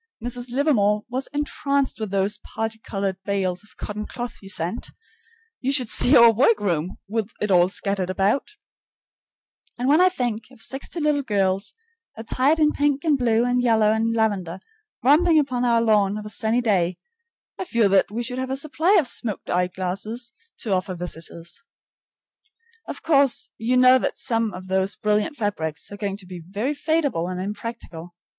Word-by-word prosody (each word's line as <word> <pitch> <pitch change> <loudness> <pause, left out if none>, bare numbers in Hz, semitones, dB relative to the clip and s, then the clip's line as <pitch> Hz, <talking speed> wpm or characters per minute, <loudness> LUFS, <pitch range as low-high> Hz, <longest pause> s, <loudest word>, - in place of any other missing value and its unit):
Mrs. 245 +1 -3
Livermore 230 -6 +2
was 260 +2 -3
entranced 280 -3 -1
with 215 -2 -3
those 200 +2 0
parti 220 +1 -5
colored 195 -3 -3
bales 190 -2 -1
of 210 - -21
cotton 210 0 -5
cloth 240 -1 -6
you 195 - -11
sent, 180 +4 -3 0.7
you 265 - -1
should 255 -5 +1
see 255 +5 +6
our 235 -1 +8
workroom, 205 - +1
with 220 0 -2
it 210 - -1
all 180 0 +5
scattered 195 -1 -2
about, 195 - +1 1.3
and 245 +1 -2
when 300 +5 +5
I 370 - +6
think 240 -10 -3
of 260 - -18
sixty 270 +8 -5
little 300 -2 +1
girls, 195 -4 -1 0.4
attired 255 +7 +1
in 305 -1 +3
pink 285 -1 0
and 310 -3 +3
blue 235 -3 +2
and 245 0 +1
yellow 220 -3 +3
and 225 +1 +1
lavender, 200 -6 -1 0.4
romping 315 +5 +5
upon 255 -5 +1
our 235 -1 +3
lawn 210 -2 +2
of 210 - -7
a 210 - -4
sunny 225 +3 0
day, 185 -6 +1 0.6
I 375 - -3
feel 235 - +2
that 195 0 +3
we 230 +4 -3
should 250 +1 -5
have 260 0 -3
a 265 - -2
supply 310 +6 +1
of 295 - 0
smoked 225 -3 -3
eye 180 0 +2
glasses 200 +7 -4 0.3
to 220 - -3
offer 185 0 -1
visitors. 170 +1 -7 1.3
Of - - -7
course 280 -5 +3
you 240 +3 +1
know 255 +1 +7
that - - -2
some 230 -3 0
of 185 0 -9
those 190 +1 +1
brilliant 210 +8 0
fabrics 160 -9 -3
are 205 - -7
going 200 -1 -3
to 200 - -7
be 180 -1 -8
very 205 - -2
fadeable 290 - 0
and 180 - -4
impractical. 190 -4 -7
220 Hz, 175 wpm, -23 LUFS, 195-255 Hz, 1.3 s, our